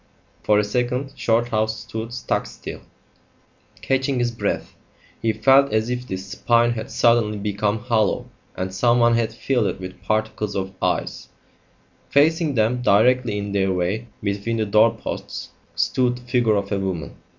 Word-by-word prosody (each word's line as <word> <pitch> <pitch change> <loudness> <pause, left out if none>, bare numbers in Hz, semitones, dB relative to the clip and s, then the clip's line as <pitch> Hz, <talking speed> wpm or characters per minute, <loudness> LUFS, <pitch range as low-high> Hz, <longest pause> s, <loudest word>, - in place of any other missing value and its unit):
For 105 - +3
a 105 - +3
second 125 +5 -1
Shorthouse 110 -1 0
stood 110 +1 -6
stock 120 - -2
still, - - -9 1.0
catching 135 0 0
his 120 -1 +1
breath. 115 - -3 0.5
He 115 - +2
felt 135 +4 +4
as 110 +2 0
if 125 0 -3
his 95 0 -4
spine 120 +4 +2
had 110 -2 -4
suddenly 115 -3 +2
become 105 +1 -1
hollow 110 -3 0 0.3
and 95 +1 -4
someone 120 +3 +3
had 115 -1 +1
filled 125 -6 0
it 95 - -3
with 95 0 -9
particles 110 0 -1
of 95 0 -3
ice. - - -2 0.8
Facing 155 0 +3
them, 115 +2 +1
directly 120 0 +3
in 100 0 -4
their 95 -1 +1
way 95 +6 -1 0.2
between 100 +3 -1
the 110 - 0
doorposts, 110 +2 0 0.3
stood 125 -1 +1
the 125 - -13
figure 120 -3 +2
of 100 0 -2
a 100 - 0
woman. 95 -6 -4
110 Hz, 150 wpm, -22 LUFS, 100-125 Hz, 1.0 s, felt